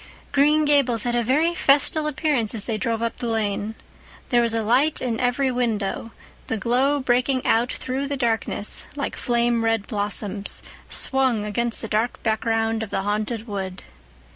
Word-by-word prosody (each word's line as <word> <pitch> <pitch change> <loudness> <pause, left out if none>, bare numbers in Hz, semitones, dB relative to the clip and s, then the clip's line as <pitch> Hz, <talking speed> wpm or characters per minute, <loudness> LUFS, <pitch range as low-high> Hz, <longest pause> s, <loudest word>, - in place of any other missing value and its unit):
Green 300 +2 +4
Gables 270 -6 +3
had 240 - -1
a 240 0 +1
very 300 +8 +2
festal 300 -1 +3
appearance 290 -7 0
as 210 - -2
they 225 - -2
drove 230 +2 -1
up 230 - -2
the 240 - -4
lane. 220 -1 -1 0.5
There 240 -1 +4
was 230 -1 0
a 225 - 0
light 260 +8 +2
in 235 -3 -2
every 255 +2 +1
window, 225 -3 -1 0.4
the 225 - -1
glow 255 +7 +2
breaking 255 0 +1
out 235 +2 +2
through 265 +2 -3
the 280 0 -3
darkness 225 -4 -1
like 280 - -3
flame 235 -1 +1
red 225 -2 +1
blossoms 205 -1 -1 0.3
swung 260 -6 +2
against 230 +3 -1
the - - -3
dark 220 +3 -1
background 225 0 0
of 220 - -4
the 195 - -2
Haunted 215 +3 -2
Wood. 190 -3 -5
235 Hz, 165 wpm, -23 LUFS, 220-260 Hz, 0.5 s, Green